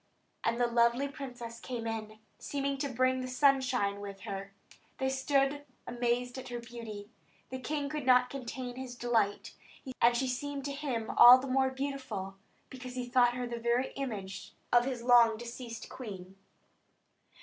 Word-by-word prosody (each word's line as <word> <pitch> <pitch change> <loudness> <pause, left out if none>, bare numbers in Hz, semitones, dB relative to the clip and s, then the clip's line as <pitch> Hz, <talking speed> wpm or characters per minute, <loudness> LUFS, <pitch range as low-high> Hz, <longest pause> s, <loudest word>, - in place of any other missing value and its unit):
And 230 +1 0
the 245 - +4
lovely 235 +3 +2
princess 245 -4 -8
came 240 -3 -5
in, 220 -1 -4 0.2
seeming 280 -1 -2
to 280 - -1
bring 255 +1 +1
the 255 - -4
sunshine 255 -6 +2
with 200 -1 -8
her. 195 0 -6 0.5
They 265 - -2
all - - +2
stood 275 +1 +1 0.2
amazed 245 +1 -1
at 260 - -8
her 240 - -4
beauty. 230 -3 -8 0.4
The 260 - -4
king 290 +2 -2
could 295 -2 -4
not 250 -1 +5
contain 255 -1 -6
his 260 -1 -6
delight; 230 -4 0 0.5
and 240 0 +5
she 260 +1 0
seemed 280 +2 -3
to 285 - -2
him 265 -6 -3
all 245 +1 +11
the 260 - -5
more 265 0 +2
beautiful, 260 -8 -5 0.3
because 255 -1 -8
he 250 -1 -3
thought 245 -1 +4
her 250 0 -2
the 240 -1 -5
very 235 +2 +1
image 210 -8 -6 0.2
of 240 0 +6
his 255 -3 -3
long 235 -2 +6
deceased 235 -1 -7
queen. 195 -6 -9
245 Hz, 165 wpm, -31 LUFS, 235-265 Hz, 0.5 s, all